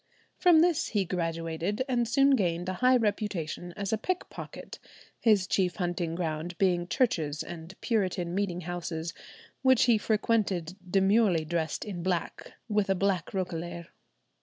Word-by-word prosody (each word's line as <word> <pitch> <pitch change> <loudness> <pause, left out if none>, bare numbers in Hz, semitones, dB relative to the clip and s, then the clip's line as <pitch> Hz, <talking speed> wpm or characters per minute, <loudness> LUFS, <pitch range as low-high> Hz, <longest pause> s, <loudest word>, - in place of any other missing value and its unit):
From 345 -4 +5
this 345 -2 +2
he 205 -3 0
graduated, 165 +4 -2
and 240 -3 +1
soon 275 +4 +4
gained 180 -8 +1
a 185 - -1
high 255 0 +6
reputation 200 -6 -2
as 200 +1 -2
a 220 - +1
pickpocket, 370 +8 -5 0.4
his 210 -5 +4
chief 185 -1 +1
hunting 175 -3 -2
ground 170 0 -3
being 175 -3 +2
churches 165 - 0
and 175 +2 -9
Puritan 185 -6 0
meeting 185 -2 -1
houses, 170 -1 -4 0.5
which 260 -2 +5
he 235 -3 +4
frequented 205 -6 0 0.2
demurely 195 -3 +3
dressed 160 -1 -2
in 190 -5 -5
black 175 -1 -3
with 210 -3 +1
a 195 - +3
black 190 -2 0
roquelaire. 170 -2 -4
185 Hz, 140 wpm, -29 LUFS, 170-215 Hz, 0.5 s, high